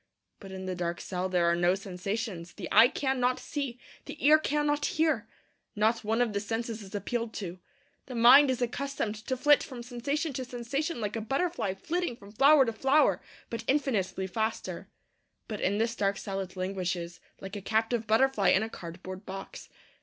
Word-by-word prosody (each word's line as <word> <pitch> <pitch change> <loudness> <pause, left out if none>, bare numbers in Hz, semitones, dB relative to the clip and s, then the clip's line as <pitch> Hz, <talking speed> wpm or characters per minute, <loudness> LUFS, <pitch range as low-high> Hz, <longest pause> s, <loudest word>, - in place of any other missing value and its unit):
But 195 -2 -10
in 190 0 -6
the 185 - -2
dark 175 -1 -3
cell 185 0 -3
there 180 -2 +2
are 170 0 +3
no 175 +1 +3
sensations. 195 -1 -4
The 185 -5 -6
eye 235 - +8
cannot 255 -2 0
see; 275 -5 -4 0.3
the - - -8
ear 305 +1 +8
cannot 295 -1 0
hear. 305 -8 +1 0.5
Not 220 +2 +2
one 225 +3 +2
of 225 -3 -3
the 200 - 0
senses 225 +2 -3
is 200 +1 -9
appealed 230 +3 -3
to. 185 -3 -5 0.5
The 255 - -7
mind 255 +5 +8
is 255 -1 0
accustomed 245 -2 -2
to 260 - -1
flit 290 +2 +5
from 250 -4 -7
sensation 280 +6 -2
to 260 - -3
sensation 255 +4 -3
like 210 0 -2
a 225 - -2
butterfly 270 - -1
flitting 340 - -2
from 200 -2 -14
flower 275 +5 +6
to 230 - -2
flower, 270 +6 +3 0.3
but 230 -1 -4
infinitely 235 -10 0
faster. 220 +4 -3 0.6
But 215 -2 -5
in 200 +2 +1
this 230 +2 0
dark 200 -2 0
cell 195 -1 -4
it 185 -1 -6
languishes 180 -2 -3 0.2
like 195 +1 -7
a 205 - -5
captive 225 +3 0
butterfly 220 -2 +3
in 190 - +4
a 220 - -4
cardboard 185 +2 -9
box. 195 0 -8
225 Hz, 185 wpm, -29 LUFS, 195-265 Hz, 0.6 s, eye